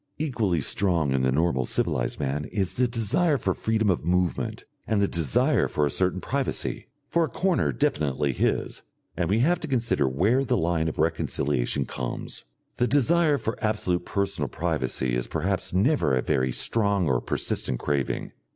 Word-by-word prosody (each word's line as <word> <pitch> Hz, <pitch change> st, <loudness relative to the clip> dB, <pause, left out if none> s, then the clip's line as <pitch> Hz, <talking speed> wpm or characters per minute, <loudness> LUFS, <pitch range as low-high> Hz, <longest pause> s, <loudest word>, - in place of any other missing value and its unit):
Equally 115 Hz, -, 0 dB
strong 85 Hz, -2 st, +2 dB
in 65 Hz, -1 st, +1 dB
the 65 Hz, 0 st, +2 dB
normal 75 Hz, -2 st, +1 dB
civilised -, -, 0 dB
man 70 Hz, +2 st, -2 dB
is 95 Hz, 0 st, -1 dB
the 125 Hz, 0 st, +2 dB
desire 125 Hz, -, +1 dB
for 95 Hz, -6 st, -1 dB
freedom 110 Hz, -1 st, +1 dB
of 90 Hz, -, -2 dB
movement 90 Hz, +1 st, -1 dB, 0.2 s
and 110 Hz, -, +1 dB
the 100 Hz, -, +3 dB
desire 80 Hz, -9 st, +1 dB
for 75 Hz, -, 0 dB
a 70 Hz, -, -1 dB
certain 95 Hz, +2 st, 0 dB
privacy, 135 Hz, +6 st, -2 dB, 0.2 s
for 170 Hz, -1 st, +2 dB
a -, -, -7 dB
corner 185 Hz, -2 st, +1 dB
definitely 75 Hz, -, 0 dB
his, -, -, -1 dB, 0.3 s
and 85 Hz, -1 st, -1 dB
we 100 Hz, -, +2 dB
have 175 Hz, +6 st, +2 dB
to 160 Hz, -, -5 dB
consider 115 Hz, -, +1 dB
where 105 Hz, -, +2 dB
the 125 Hz, -2 st, 0 dB
line 80 Hz, -2 st, 0 dB
of 80 Hz, -, -4 dB
reconciliation 75 Hz, -5 st, 0 dB
comes. 60 Hz, -1 st, -5 dB, 0.3 s
The 125 Hz, -, +2 dB
desire 150 Hz, +4 st, +3 dB
for 110 Hz, -3 st, -4 dB
absolute 100 Hz, -5 st, 0 dB
personal 100 Hz, +1 st, -1 dB
privacy 75 Hz, -6 st, -1 dB
is 60 Hz, -, -2 dB
perhaps 90 Hz, +4 st, -1 dB
never 95 Hz, -, +2 dB
a 65 Hz, -, 0 dB
very 65 Hz, -4 st, +1 dB
strong 100 Hz, -, +1 dB
or 65 Hz, -3 st, +1 dB
persistent 65 Hz, -, -1 dB
craving. 70 Hz, 0 st, -2 dB
90 Hz, 170 wpm, -26 LUFS, 75-115 Hz, 0.3 s, the